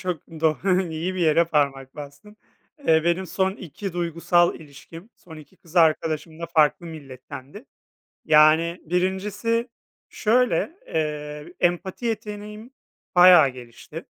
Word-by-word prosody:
çok 180 -5 -4 0.2
doğ 160 -1 +2 0.3
iyi 170 +4 -3
bir 185 - -4
yere 165 +1 +3
parmak 140 -4 -1
bastın. 145 +9 -11 0.5
Eee, 160 0 +4
benim 175 +2 0
son 190 +3 0
2 195 0 -8
duygusal 175 0 +1
ilişkim, 160 - -13
son 160 -3 -14
2 155 +4 -15
kız 170 +1 -16
arkadaşım 160 0 +1
da 170 - -4
farklı 160 0 +2
millettendi. 140 - -11 0.6
Yani 160 +3 +4
birincisi 200 +7 -1 0.4
şöyle, 250 +7 +1 0.2
eee, 150 +1 -4
empati 180 +6 -1
yeteneğim 210 +1 -6 0.4
bayağı 175 -5 +8
gelişti. 120 -2 -11
170 Hz, 120 wpm, -23 LUFS, 155-190 Hz, 0.6 s, bayağı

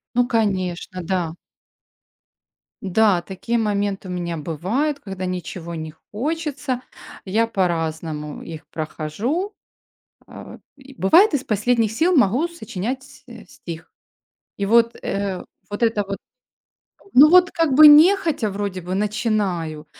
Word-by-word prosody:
Ну 245 0 +3
конечно, 185 -5 -1
да. 175 -2 -2 1.5
Да, 195 -1 +2
такие 205 +6 -3
моменты 205 -3 -1
у - - -6
меня 170 -2 -3
бывают, 210 - -2
когда 190 -2 -6
ничего 175 -1 -5
не 155 -1 -6 0.2
хочется. 285 0 -3 0.4
Я 220 +4 +1
по-разному 160 -6 -2
их 160 -2 -9
прохожу. 205 - -3 0.7
Э, - - -11 0.2
и 270 0 -15
бывает, 330 - +5
из 270 - -1
последних 220 +1 +1
сил 335 +8 +2
могу 260 - +3
сочинять, 260 - -6
э, - - -12
стих. 165 -1 -10 0.7
И 200 - -1
вот, 230 +2 +3
э, 195 -2 -3 0.3
вот 205 +3 -3
это 225 -2 +2
вот 200 - -4 1.0
Ну 295 +4 +9
вот 360 0 +6
как 325 -5 +1
бы 305 +2 +10
нехотя 315 - +5
вроде 195 -2 -4
бы 180 +2 -4
начинаю, 200 -7 -1
205 Hz, 125 wpm, -21 LUFS, 180-260 Hz, 1.5 s, бы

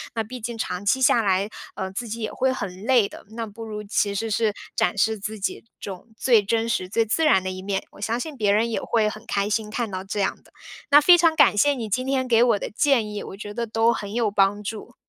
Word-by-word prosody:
那 225 - 0
毕 250 +4 -8
竟 235 0 -5
长 180 -3 -4
期 260 +6 +2
下 235 -2 +5
来， 195 -1 +1 0.3
呃， 190 0 -4
自 235 +5 -5
己 230 +2 -5
也 215 - -3
会 260 0 +1
很 195 -6 -5
累 245 -5 +4
的。 - - -12
那 230 -1 -3
不 220 +1 -10
如 210 -1 -6
其 205 -1 0
实 225 +3 -2
是 215 0 +1 0.2
展 180 - +1
示 220 +2 +2
自 215 +2 -5
己 195 - -3 0.2
这 200 - -6
种 185 +2 -10
最 230 -5 +4
真 225 +3 0
实 185 -5 -1
最 225 +3 +1
自 240 +9 0
然 190 -11 +4
的 185 - -3
一 185 0 -7
面， 195 0 -2
我 - - -15
相 225 +3 -1
信 305 +3 -5
别 210 -3 +2
人 220 +3 +2
也 - - -1
会 220 -2 +1
很 215 +1 -10
开 200 +1 -1
心 215 0 -1
看 225 0 -3
到 185 0 -4
这 195 +2 -4
样 195 - -1
的。 - - -23 0.4
那 290 +1 +7
非 350 +4 +7
常 330 -2 +3
感 285 -9 +5
谢 290 +8 +4
你 235 -5 -5
今 255 +6 -1
天 265 -1 0
给 230 -2 +4
我 230 -4 +3
的 - - -4
建 235 -3 +1
议， 205 - -5
我 195 - -9
觉 205 0 -7
得 235 +2 -2
都 225 +1 +2
很 205 -2 -6
有 230 -3 0
帮 200 +1 +2
助。 220 +3 -7
220 Hz, 285 characters per minute, -24 LUFS, 200-235 Hz, 0.4 s, 那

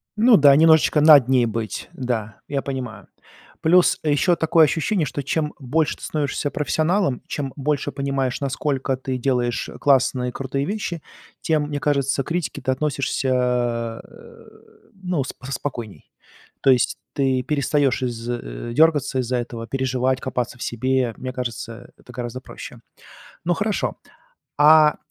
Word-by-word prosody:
Ну 225 +2 +6
да, 140 -2 +7
немножечко 160 -1 +5
над 145 -5 +8
ней 130 -2 +3
быть, 115 -1 -4
да, 115 -4 -4
я 140 -1 -2
понимаю. 130 -5 -6 0.5
Плюс 175 +3 +4
ещё 155 +4 +2
такое 160 0 +4
ощущение, 165 +3 0
что 145 0 -4
чем 150 +2 -1
больше 145 +4 0
ты - - -15
становишься 145 -1 -2
профессионалом, 155 -1 0
чем 135 -3 -4
больше 145 0 -1
понимаешь, 135 -2 -2
насколько 135 -1 -1
ты 130 0 -4
делаешь 125 -2 -1
классные, 130 -2 +2
крутые 135 +1 -3
вещи, 185 -4 -4 0.4
тем, 155 -2 +1
мне 145 -1 -3
кажется, 140 -1 0
к - - -17
критике 165 -5 -3
ты 130 - 0
относишься 140 -1 -1
а, 120 -2 -1
э, - - -16 0.5
ну, 180 -7 -2
спо 130 0 -9
спокойней. 120 -5 -6 0.5
То 135 - +3
есть 125 -2 +2 0.2
ты 135 -3 +1
перестаешь 140 -2 +1
из 120 -1 -4
э, 115 - -5
дергаться 145 -4 +3
из-за 125 +1 -1
этого, 120 -1 -5
переживать, 130 0 -1
копаться 125 -1 -3
в - - -6
себе. 130 0 0
Мне 130 0 -6
кажется, 120 -1 -6
это 125 - -16
гораздо 120 +1 -5
проще. - - -10 0.7
Ну, 175 - +2
хорошо. 210 +4 -2 0.6
А 150 0 +6
135 Hz, 145 wpm, -22 LUFS, 125-150 Hz, 0.7 s, над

